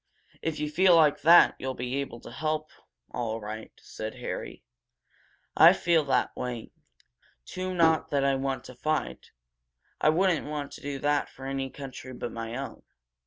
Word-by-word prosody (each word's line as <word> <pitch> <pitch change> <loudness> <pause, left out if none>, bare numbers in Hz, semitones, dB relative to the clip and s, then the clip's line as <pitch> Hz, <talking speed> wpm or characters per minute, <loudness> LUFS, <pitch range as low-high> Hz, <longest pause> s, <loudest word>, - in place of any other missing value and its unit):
"If 160 -1 -3
you 150 - -1
feel 180 +4 +5
like 155 -3 +4
that 170 +4 +7
you'll 130 0 -3
be 125 +2 -3
able 140 -4 -4
to - - -11
help, 155 +3 -2 0.4
all 115 -2 -3
right," 110 +1 -7
said 110 0 -7
Harry. - - -6 0.9
"I - - +9
feel 170 -2 +2
that 130 -3 +1
way, 125 -3 -5 0.7
too 185 0 -4
not 160 -2 +3
that 140 -1 +1
I 140 - +3
want 135 -1 -2
to 130 - -11
fight. 155 +5 -2 0.7
I - - +5
wouldn't 175 0 +2
want 150 -1 -4
to - - -11
do 140 -1 -4
that 145 +1 0
for 135 - -11
any 135 0 -3
country 130 -2 -9
but 120 -1 -5
my 115 0 -5
own. 135 0 -6
140 Hz, 165 wpm, -28 LUFS, 125-155 Hz, 0.9 s, I